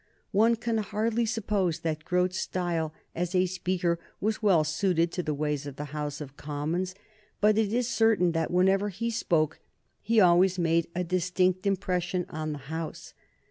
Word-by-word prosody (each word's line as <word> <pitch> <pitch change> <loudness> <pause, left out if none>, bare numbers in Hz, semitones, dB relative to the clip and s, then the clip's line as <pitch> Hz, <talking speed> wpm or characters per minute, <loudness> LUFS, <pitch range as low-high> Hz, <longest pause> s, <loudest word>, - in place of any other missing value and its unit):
One 225 +4 +4
can 225 0 -1
hardly 220 +3 0
suppose 205 -6 0
that 155 -1 -2
Grote's 180 +1 +1
style 170 -4 -1 0.2
as 175 +1 -2
a 185 0 +4
speaker 180 -1 -1 0.2
was 215 +2 -1
well 190 -7 +4
suited 165 +2 +1
to 180 - -2
the 155 -3 -2
ways 150 -1 -2
of 140 - -7
the 150 - -5
House 150 -1 -3
of 140 -2 -8
Commons, 155 +6 -3 0.4
but 210 0 +4
it 215 -2 +1
is 240 +1 +1
certain 220 -7 +3
that 165 -1 -1
whenever 190 +3 +3
he 230 +5 -3
spoke 160 -8 0 0.4
he 225 +2 +2
always 180 0 +5
made 165 -1 +2
a 180 - 0
distinct 185 +1 +1
impression 180 -2 0
on 155 0 -3
the 150 - -4 0.2
House. 160 -1 -6
180 Hz, 170 wpm, -28 LUFS, 165-205 Hz, 0.4 s, always